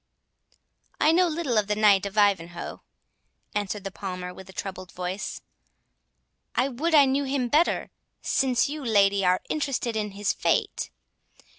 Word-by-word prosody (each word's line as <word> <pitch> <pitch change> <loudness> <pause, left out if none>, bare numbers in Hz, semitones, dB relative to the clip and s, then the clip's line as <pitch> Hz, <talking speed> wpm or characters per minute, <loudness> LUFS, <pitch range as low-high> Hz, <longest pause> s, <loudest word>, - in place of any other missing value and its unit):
"I 310 - +5
know 360 +2 +4
little 305 -8 0
of 205 - -1
the 210 - 0
Knight 205 -2 +4
of 200 +2 -10
Ivanhoe," 175 -4 +1 0.7
answered 205 -1 -2
the 195 - -5
Palmer, 180 -2 -6
with 190 +1 -12
a - - -9
troubled 185 -1 -6
voice. 180 +3 -4 1.1
"I 255 +3 +2
would 310 +6 0
I 285 -2 +8
knew 275 +1 +1
him 265 -2 -1
better, 315 +7 +2 0.3
since 260 -1 +2
you, 295 +1 -5
lady, 200 -4 +3
are 180 0 +3
interested 275 -6 -1
in 210 -2 -2
his 200 0 0
fate. - - 0
210 Hz, 150 wpm, -26 LUFS, 195-270 Hz, 1.1 s, I